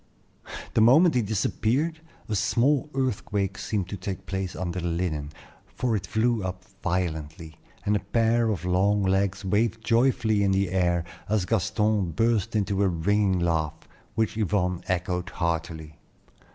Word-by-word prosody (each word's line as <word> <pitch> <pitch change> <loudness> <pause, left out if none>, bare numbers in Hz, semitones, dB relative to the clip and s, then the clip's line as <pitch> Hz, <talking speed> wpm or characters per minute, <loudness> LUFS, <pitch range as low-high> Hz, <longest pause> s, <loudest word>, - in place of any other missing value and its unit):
The 110 - +3
moment 155 +10 +6
he 125 - +2
disappeared, 115 - 0 0.3
a 110 - -3
small 125 +9 +2
earthquake 100 -7 -1
seemed 100 -5 -2
to 100 - -5
take 95 +1 -5
place 95 0 -3
under 90 0 -3
the 85 - -2
linen, 85 -4 -2 0.5
for 120 -1 0
it 100 - -3
flew 115 0 +1
up 90 0 -5 0.2
violently, 80 -3 -3 0.3
and 105 - +2
a - - +2
pair 115 +3 +1
of 95 -5 -2
long 100 +3 +2
legs 95 +1 0
waved 110 +3 0
joyfully 115 -3 +2
in 100 -1 +2
the 95 -2 +1
air 85 -2 +1 0.3
as 105 -3 +1
Gaston 105 -2 +1
burst 115 +1 +1
into 100 -1 0
a 100 - +4
ringing 95 +3 +1
laugh, 80 -3 0 0.4
which 110 -1 0
Yvonne 90 -4 0
echoed 90 0 -1
heartily. 80 -2 -3
100 Hz, 150 wpm, -26 LUFS, 90-110 Hz, 0.5 s, moment